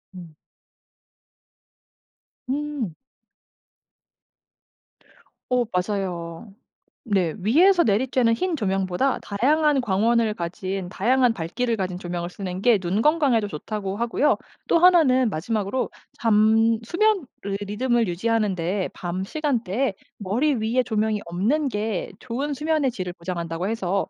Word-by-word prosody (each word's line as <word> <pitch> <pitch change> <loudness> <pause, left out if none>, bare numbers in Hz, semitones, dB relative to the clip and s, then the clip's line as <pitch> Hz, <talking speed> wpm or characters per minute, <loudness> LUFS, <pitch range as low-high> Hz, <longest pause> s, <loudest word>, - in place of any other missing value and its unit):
음. 170 -4 -11 2.1
음. 280 - -3 2.6
어 250 -1 +2
맞아요. 180 0 -3 0.6
네. 185 -6 +1
위에서 340 - +4
내리쬐는 230 +2 +2
흰 345 +6 -1
조명보다 195 +3 0
다양한 285 +7 +2
광원을 225 +1 +2
가진 185 +1 -4
다양한 245 +6 +2
밝기를 230 +8 -2
가진 185 -3 -3
조명을 175 -1 -4
쓰는 185 -1 -5
게 240 -4 +5
눈 190 +3 -1
건강에도 275 -7 +3
좋다고 195 +4 -4
하고요. 235 +5 +2 0.3
또 - - +4
1는 275 -10 +5
마지막으로 210 +7 -2 0.3
잠 225 0 +4
수면을 390 - +1 0.3
리듬을 230 +2 0
유지하는 210 +3 0
데 180 +3 -1
밤 180 +1 -4
시간대에 250 -4 -1 0.2
머리 235 +10 +1
위에 230 +2 +1
조명이 220 -2 0
없는 225 - 0
게 210 -4 -3
좋은 270 +4 -3
수면의 300 -2 +1
질을 185 -6 -5
보장한다고 170 +1 -4
해서 195 -3 -1
220 Hz, 250 characters per minute, -24 LUFS, 185-255 Hz, 2.6 s, 게